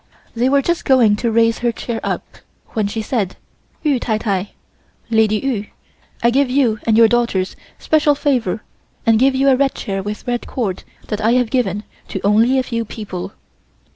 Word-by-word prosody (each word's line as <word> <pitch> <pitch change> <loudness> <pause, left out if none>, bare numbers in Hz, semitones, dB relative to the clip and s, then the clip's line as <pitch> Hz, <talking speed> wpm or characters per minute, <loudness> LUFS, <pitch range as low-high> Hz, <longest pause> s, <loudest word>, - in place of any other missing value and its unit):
They 245 +3 +2
were 280 0 +3
just 345 +3 0
going 240 -6 +4
to 235 +1 -1
raise 230 0 +3
her 240 -1 +1
chair 230 0 -4
up - - -2 0.4
when 215 -3 -1
she 220 +2 -3
said: 210 -5 -2 0.5
"Yu 290 -5 +2
tai 220 -3 -1
tai 200 -3 -2 0.6
(Lady 220 -1 +3
Yu) 220 -5 -2 0.6
I 235 - +4
give 275 +1 +2
you 250 -5 +2
and 220 -1 +4
your 230 -1 +7
daughters 230 -6 0 0.2
special 305 -2 +2
favor 250 -8 0 0.4
and 225 -1 +4
give 265 +1 +3
you 270 +1 +2
a 270 - +6
red 270 +1 +1
chair 195 -1 -3
with 210 +2 -6
red 245 -1 -2
cord 205 -8 -3 0.3
that 210 0 -2
I 225 +2 +3
have 250 -2 +1
given 210 -6 0 0.2
to - - -4
only 225 +6 +4
a 260 - +2
few 230 -2 -2
people." 200 -4 -7
230 Hz, 185 wpm, -18 LUFS, 210-260 Hz, 0.6 s, your